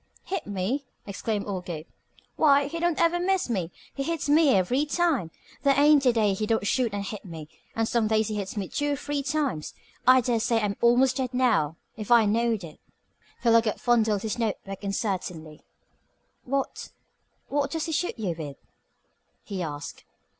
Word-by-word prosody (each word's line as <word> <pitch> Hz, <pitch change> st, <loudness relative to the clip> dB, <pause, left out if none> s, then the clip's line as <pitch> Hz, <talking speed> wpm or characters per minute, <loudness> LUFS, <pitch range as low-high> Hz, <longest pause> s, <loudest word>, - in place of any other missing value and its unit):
"Hit 380 Hz, -4 st, -4 dB
me?" 205 Hz, +8 st, -2 dB, 0.2 s
exclaimed 205 Hz, +1 st, -3 dB
old 185 Hz, -3 st, -4 dB
Gabe. 160 Hz, -3 st, -6 dB, 0.5 s
"Why, 285 Hz, -2 st, +4 dB
he 330 Hz, +4 st, -4 dB
don't 345 Hz, -1 st, 0 dB
ever 340 Hz, +1 st, +3 dB
miss 370 Hz, -6 st, 0 dB
me. 185 Hz, -7 st, -1 dB, 0.2 s
He 275 Hz, -, -4 dB
hits 325 Hz, +2 st, -2 dB
me 300 Hz, +1 st, +5 dB
every 220 Hz, +10 st, +2 dB
time. 300 Hz, -, +1 dB, 0.3 s
There 280 Hz, -1 st, +3 dB
ain't 290 Hz, -2 st, +5 dB
a -, -, +7 dB
day 215 Hz, -4 st, +2 dB
he 215 Hz, +2 st, -2 dB
don't 225 Hz, -2 st, +1 dB
shoot 240 Hz, +1 st, +1 dB
and 200 Hz, 0 st, -3 dB
hit 210 Hz, 0 st, -6 dB
me, 160 Hz, -5 st, -8 dB, 0.3 s
and 225 Hz, 0 st, +1 dB
some 230 Hz, -2 st, +1 dB
days 220 Hz, 0 st, +2 dB
he 215 Hz, -, -3 dB
hits 205 Hz, 0 st, -4 dB
me 195 Hz, -2 st, -2 dB
two 290 Hz, +7 st, -1 dB
or -, -, 0 dB
three 290 Hz, 0 st, -3 dB
times. 275 Hz, -, -2 dB, 0.3 s
I 255 Hz, 0 st, +7 dB
dare 240 Hz, -1 st, 0 dB
say 230 Hz, 0 st, +1 dB
I'm 205 Hz, -2 st, -1 dB
almost 245 Hz, +2 st, +4 dB
dead 255 Hz, -1 st, -2 dB
now, 220 Hz, -, +2 dB, 0.2 s
if 215 Hz, -2 st, -6 dB
I 235 Hz, -2 st, +6 dB
knowed 225 Hz, -1 st, +1 dB
it." 155 Hz, -3 st, -10 dB, 0.6 s
Philo 230 Hz, -1 st, +6 dB
Gubb 220 Hz, -2 st, -2 dB
fondled 220 Hz, -4 st, +2 dB
his 220 Hz, +2 st, -3 dB
notebook 200 Hz, -3 st, -3 dB
uncertainly. 180 Hz, -6 st, -3 dB, 0.8 s
"What 275 Hz, +1 st, -2 dB, 0.6 s
what 285 Hz, 0 st, 0 dB
does 320 Hz, +1 st, -2 dB
he 325 Hz, -, -4 dB
shoot 335 Hz, 0 st, -1 dB
you 200 Hz, -6 st, -2 dB
with?" 145 Hz, -4 st, -7 dB, 0.9 s
he 195 Hz, -3 st, -5 dB
asked. 145 Hz, -3 st, -6 dB
230 Hz, 180 wpm, -26 LUFS, 200-280 Hz, 0.9 s, a